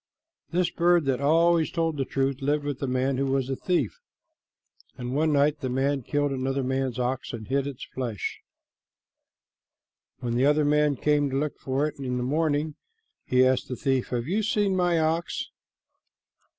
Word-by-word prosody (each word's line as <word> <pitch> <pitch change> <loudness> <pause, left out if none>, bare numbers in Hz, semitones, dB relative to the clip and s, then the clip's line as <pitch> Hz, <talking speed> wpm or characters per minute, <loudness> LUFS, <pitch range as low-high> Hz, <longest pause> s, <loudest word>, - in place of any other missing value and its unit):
This 175 0 +1
bird 175 -2 +3
that 135 -1 0
always 165 +2 +4
told 165 -2 -1
the 135 -2 -1
truth 135 +1 -1
lived 145 +2 +1
with 145 -2 -3
a 135 - -1
man 130 +1 0
who 135 +1 0
was 135 -1 0
a - - 0
thief, 160 - -1 1.0
and 125 0 -4
one 155 +2 +2
night 145 +1 +3
the 130 -3 -3
man 135 +2 0
killed 145 +3 0
another 135 0 -1
man's 130 -1 -1
ox 125 +1 -2
and 110 -2 -6
hid 140 +1 0
its 140 -3 -6
flesh. 120 -6 -3 1.8
When 120 -2 -3
the 125 +3 +2
other 150 0 +3
man 150 0 +3
came 145 +1 +2
to 135 - -1
look 150 +1 -1
for 135 +2 0
it 150 - -8
in 125 -2 -2
the 125 - -1
morning, 150 +2 0 0.5
he 130 0 +4
asked 130 -1 +1
the 125 - -4
thief, 135 -1 0
"Have 120 0 -3
you 200 +6 +1
seen 205 -2 +1
my 175 -2 +2
ox?" 160 +2 -1
140 Hz, 175 wpm, -26 LUFS, 130-155 Hz, 1.8 s, always